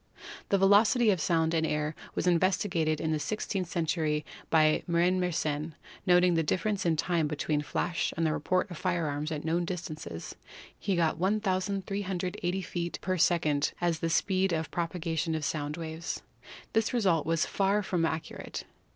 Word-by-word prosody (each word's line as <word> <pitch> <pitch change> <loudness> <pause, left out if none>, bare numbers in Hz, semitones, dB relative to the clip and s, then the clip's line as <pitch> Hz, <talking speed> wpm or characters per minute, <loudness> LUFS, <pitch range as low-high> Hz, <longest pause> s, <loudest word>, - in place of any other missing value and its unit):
The 200 - +4
velocity 210 +4 +5
of 185 -5 0
sound 160 -1 +2
in 160 -1 +2
air 150 -1 -1 0.2
was - - -1
investigated 175 -3 +2
in 160 - -1
the 155 - +1
six 215 +7 -3
teenth 190 -4 -2
century 155 -3 0 0.2
by 155 -1 +4
Marin 175 +2 +2
Mersenne. 155 -3 -1 0.3
Noting 180 0 +5
the 165 - +3
difference 185 +4 0
in 165 - +3
time 165 0 +1
between 150 0 -1
the 150 - -5
flash 170 +5 -1
and 165 - +1
the 155 - +2
report 185 +6 0
of 170 - -7
fire 175 -3 0
arms 150 +1 -2
at 150 -1 -4
known 170 +2 +1
distances, 160 - -5 0.4
he 195 - -1
got 165 -2 +1
1,380 190 -2 -1
feet 175 -1 -3
per 185 0 0
second 155 -4 +2
as 170 -2 0
the 165 - -1
speed 190 +2 +2
of 160 -1 -2
propagation 165 -2 -1
of 155 -2 -2
sound 150 0 -2
waves. 160 0 -5 0.5
This 225 +2 +1
result 185 -11 +2
was 165 +1 +2
far 200 +1 +1
from 180 -3 0
accurate. 160 -1 -3
170 Hz, 170 wpm, -29 LUFS, 160-185 Hz, 0.5 s, velocity